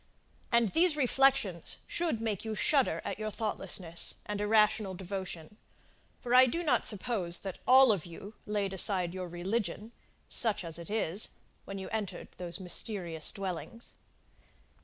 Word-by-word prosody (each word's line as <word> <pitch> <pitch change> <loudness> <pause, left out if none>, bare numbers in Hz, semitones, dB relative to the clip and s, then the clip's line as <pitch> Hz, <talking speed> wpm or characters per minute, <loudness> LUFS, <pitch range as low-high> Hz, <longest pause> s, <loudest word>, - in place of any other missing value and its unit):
And 235 -2 +3
these 330 -1 +4
reflections 270 - +2
should 335 -9 -1
make 220 -4 -3
you 220 -1 -4
shudder 275 +3 +1
at - - -4
your 215 0 -3
thoughtlessness, 195 -6 0
and 210 0 -4
irrational 210 -2 +2
devotion, 185 -1 -6 0.7
for 245 -1 -2
I 255 +1 +8
do 335 +7 -2
not 310 - +2
suppose 195 -5 0
that 195 -2 -6
all 260 -1 +7
of 185 -5 -2
you 195 +5 -10
laid 205 -2 -2
aside 185 -2 +4
your 185 -1 -5
religion, 195 +4 -3 0.4
such 220 -6 +1
as 165 0 -5
it 170 - -9
is, 210 -2 0 0.4
when 195 - -7
you 190 - -6
entered 215 -4 -5
those 175 0 -6
mysterious 180 -3 -2
dwellings. 195 +5 -7
205 Hz, 145 wpm, -30 LUFS, 180-230 Hz, 0.7 s, I